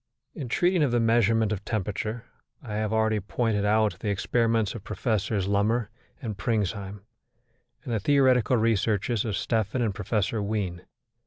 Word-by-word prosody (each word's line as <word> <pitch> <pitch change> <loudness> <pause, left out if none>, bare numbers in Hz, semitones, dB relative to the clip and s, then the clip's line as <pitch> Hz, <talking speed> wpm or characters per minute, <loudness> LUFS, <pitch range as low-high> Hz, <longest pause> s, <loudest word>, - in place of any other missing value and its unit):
In 130 - -6
treating 175 +5 +2
of 145 - +3
the 120 0 +2
measurement 115 -1 +3
of 100 -2 -3
temperature, 110 +2 -3 0.4
I 110 -4 -6
have 110 0 -1
already 110 -1 +2
pointed 105 +1 -1
out 105 -3 +2
the 105 - -2
experiments 115 +1 +1
of 115 - -8
Professors 105 -4 -1
Lummer 105 +3 +1 0.3
and 110 -4 -3
Pringsheim 100 -1 -2 0.8
and 120 - -4
the 110 - +1
theoretical 130 0 +3
researches 110 0 +1
of 105 -3 -1
Stephan 115 +2 0
and 110 -4 0
Professor 105 +2 -1
Wien. 100 -4 -2
110 Hz, 150 wpm, -26 LUFS, 100-115 Hz, 0.8 s, of